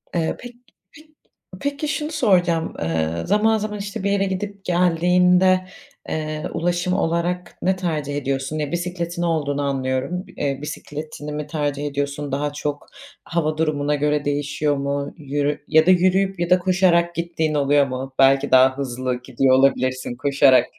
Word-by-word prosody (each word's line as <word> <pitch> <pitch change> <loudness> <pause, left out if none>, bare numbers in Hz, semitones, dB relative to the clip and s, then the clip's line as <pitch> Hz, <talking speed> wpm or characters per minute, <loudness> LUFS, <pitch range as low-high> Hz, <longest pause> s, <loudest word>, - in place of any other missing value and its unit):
Eee, 165 -2 0
pek 245 -1 -10 0.4
pek 310 +1 -16 0.5
peki 285 +4 -2
şunu 300 +1 -2
soracağım. 180 - +2
Eee, 80 -1 0 0.2
zaman, 220 +2 +3
zaman 210 -1 -4
işte 200 +1 -5
bir 200 - +1
yere 200 -1 +2
gidip 195 +1 -5
geldiğinde, 180 +1 +3 0.4
eee, 155 -1 -3
ulaşım 175 +1 0
olarak 175 +1 -1
ne 190 +1 +2
tercih 155 -6 -3
ediyorsun? 135 +2 -2
Eee, 150 -2 -3
bisikletin 175 0 -3
olduğunu 150 -4 0
anlıyorum. 135 +5 -2
Eee, 140 -1 -1
bisikletini 150 0 -7
mi 150 0 -4
tercih 145 -1 -2
ediyorsun? 145 0 -3
Daha 145 +2 -1
çok 145 0 -4 0.4
hava 155 -2 -1
durumuna 150 -2 0
göre 150 0 0
değişiyor 145 0 0
mu? 140 +1 -3
Yürü 145 0 -2
ya 160 +1 +5
da 185 - +6
yürüyüp, 185 +1 +2
ya 175 0 -1
da 180 - +5
koşarak 175 -2 +2
gittiğin 165 -2 -1
oluyor 145 -1 +3
mu? 130 +1 -5
Belki 135 0 +4
daha 130 +1 +5
hızlı 130 -2 -3
gidiyor 130 +1 +2
olabilirsin 130 -2 +1
koşarak. 140 0 +4
155 Hz, 150 wpm, -22 LUFS, 140-180 Hz, 0.5 s, da